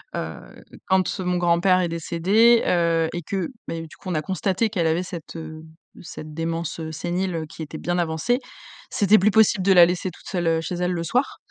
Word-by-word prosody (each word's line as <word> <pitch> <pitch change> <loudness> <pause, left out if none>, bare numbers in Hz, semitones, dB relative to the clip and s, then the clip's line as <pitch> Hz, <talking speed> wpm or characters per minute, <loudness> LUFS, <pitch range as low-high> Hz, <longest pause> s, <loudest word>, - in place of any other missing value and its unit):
heu, 80 -3 -7 0.3
quand 190 +1 +1
mon 180 -1 0
grand-père 175 +2 +3
est 180 - +1
décédé, 190 +8 +3
heu 165 -2 +2
et 175 - -3
que, 185 +1 -3 0.2
ben, 165 0 -4
du - - -15
coup, 185 - -9
on - - -1
a 155 - 0
constaté 190 +5 -1
qu'elle 170 -5 0
avait 165 +3 +1
cette, 170 -2 -8
heu, 160 0 -8 0.4
cette 155 -2 -9
démence, 165 0 -3
heu 160 - -5
sénile, 175 +3 -2
heu, 160 -1 -3
qui 160 - -11
était 155 +1 -8
bien 175 +2 -2
avancée, 170 +9 0 0.5
c'était 205 +1 +4
plus 200 +3 +3
possible 220 -2 +4
de 195 - +3
la 175 -2 +8
laisser 180 +1 -2
toute - - -16
seule, 175 -4 -2
heu, 165 0 +2
chez 180 - -4
elle, 180 +1 -1
le 170 -2 -2
soir. 250 - 0
175 Hz, 215 wpm, -23 LUFS, 165-190 Hz, 0.5 s, la